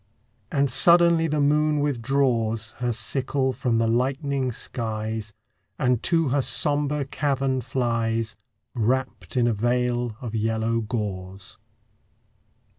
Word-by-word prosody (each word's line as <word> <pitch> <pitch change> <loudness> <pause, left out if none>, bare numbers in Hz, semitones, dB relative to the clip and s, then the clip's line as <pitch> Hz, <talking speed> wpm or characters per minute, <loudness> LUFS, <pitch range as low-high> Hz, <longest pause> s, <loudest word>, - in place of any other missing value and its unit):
And 140 -2 +1
suddenly 170 +2 +5
the 150 -1 -1
moon 150 +1 +2
withdraws 120 -5 0
Her 120 -1 0
sickle 130 +2 -1
from 120 -2 0
the 115 - +2
lightening 130 +3 0
skies, 110 -2 -4 0.5
And 125 -4 +1
to 165 -4 +1
her 140 +2 +2
sombre 145 +1 +1
cavern 135 -2 -1
flies, 115 -2 -1 0.4
Wrapped 130 +3 -2
in 120 - +3
a 120 - +2
veil 120 +1 0
of 115 -3 -6
yellow 110 +1 0
gauze. 100 -4 -5
125 Hz, 115 wpm, -24 LUFS, 115-140 Hz, 0.5 s, suddenly